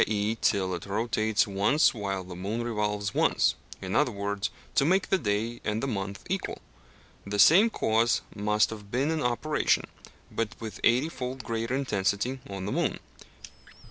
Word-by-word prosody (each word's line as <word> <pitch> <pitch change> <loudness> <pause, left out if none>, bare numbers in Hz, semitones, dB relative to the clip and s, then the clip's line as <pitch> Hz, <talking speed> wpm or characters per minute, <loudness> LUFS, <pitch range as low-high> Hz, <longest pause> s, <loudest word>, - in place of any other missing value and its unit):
e._ 105 +1 0
till 95 -3 +2
it 90 - -5
rotates 110 +1 +1
once 105 +9 +3
while 100 -4 -3
the 90 -1 -9
moon 105 +6 -3
revolves 105 -3 -1
once; - - +3 0.3
in - - -3
other - - +3
words, 100 0 -2 0.2
to - - +3
make 180 +3 +2
the 190 - +4
day 115 -1 -1
and 110 +2 -1
the - - 0
month 100 -2 -4
equal. 190 +1 -2 0.7
The 100 +1 -4
same 185 - +7
cause 115 - +2
must 105 +1 +2
have 105 -2 -9
been 135 +7 0
in 160 -1 -1
operation, 125 +5 +1 0.5
but 115 -2 -3
with 110 -5 -7
eighty 125 +6 +4
fold 130 -2 -5
greater 115 +2 -2
intensity, 120 0 0
on 95 -1 -5
the 100 - -3
moon. - - 0
110 Hz, 165 wpm, -28 LUFS, 100-125 Hz, 0.7 s, same